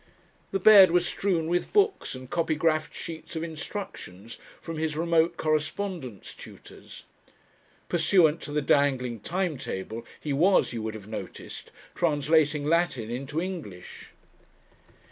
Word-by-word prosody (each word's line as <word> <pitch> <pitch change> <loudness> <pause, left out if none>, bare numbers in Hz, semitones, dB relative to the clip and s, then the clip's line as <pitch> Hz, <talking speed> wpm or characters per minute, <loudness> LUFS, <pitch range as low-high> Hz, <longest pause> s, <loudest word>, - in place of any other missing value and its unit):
The 195 - 0
bed 195 -2 +9
was 175 +1 +3
strewn 175 -3 0
with 175 +2 -1
books 405 - +2
and 130 0 -9
copygraphed 155 0 0
sheets 160 0 -8
of 160 - -2
instructions 155 - -7 0.2
from 165 -2 -6
his 155 -1 -2
remote 170 0 +2
correspondence 155 - -3
tutors. - - -13 0.8
Pursuant 170 -2 +3
to 145 - -7
the 150 0 0
dangling 130 -5 +1
time 170 - -2
table 110 0 -5 0.2
he 150 - -3
was, 180 +4 +3
you 115 - -4
would 110 0 -4
have 105 -2 -10
noticed, 110 - -8 0.2
translating 150 -2 +2
Latin 150 -8 0
into 135 +5 -3
English. 165 - -7
155 Hz, 125 wpm, -27 LUFS, 135-175 Hz, 0.8 s, bed